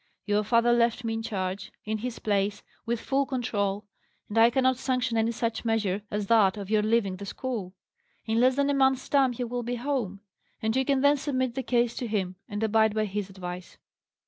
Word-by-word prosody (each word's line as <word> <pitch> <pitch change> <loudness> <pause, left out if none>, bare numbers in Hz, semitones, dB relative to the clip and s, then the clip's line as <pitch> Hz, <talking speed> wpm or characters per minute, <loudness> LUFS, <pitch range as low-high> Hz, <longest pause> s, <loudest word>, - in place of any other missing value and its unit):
Your 205 0 +1
father 235 +2 +3
left 235 0 +2
me 225 -1 -1
in 225 - -2
charge, 190 -3 -4
in 215 0 -2
his 240 +1 -4
place, 205 -1 -1 0.2
with 235 0 0
full 275 +2 0
control; 210 -6 -1 0.4
and 210 - -4
I 230 +1 +7
cannot 260 +1 +2
sanction 255 -3 0
any 225 0 +2
such 230 0 -2
measure 215 -4 0
as 210 0 -2
that 210 -2 +4
of 200 0 -6
your 215 -1 +4
leaving 210 -3 +1
the 200 - -7
school. 210 -6 -4 0.5
In 225 0 +1
less 255 +1 +4
than 280 +1 +2
a - - +1
month's 265 -1 +2
time 270 -3 +3
he 245 - -3
will 245 +1 -3
be 240 +1 -3
home, 240 -7 -2 0.4
and 220 0 -1
you 265 0 +2
can 275 -1 +2
then 285 +1 +5
submit 260 -3 -1
the 265 - -2
case 240 -2 +1
to 245 - -3
him, 190 -4 -2
and 205 +1 -3
abide 220 0 +3
by 215 0 +1
his 200 -1 -4
advice." 180 -2 -8
225 Hz, 210 wpm, -27 LUFS, 205-250 Hz, 0.5 s, I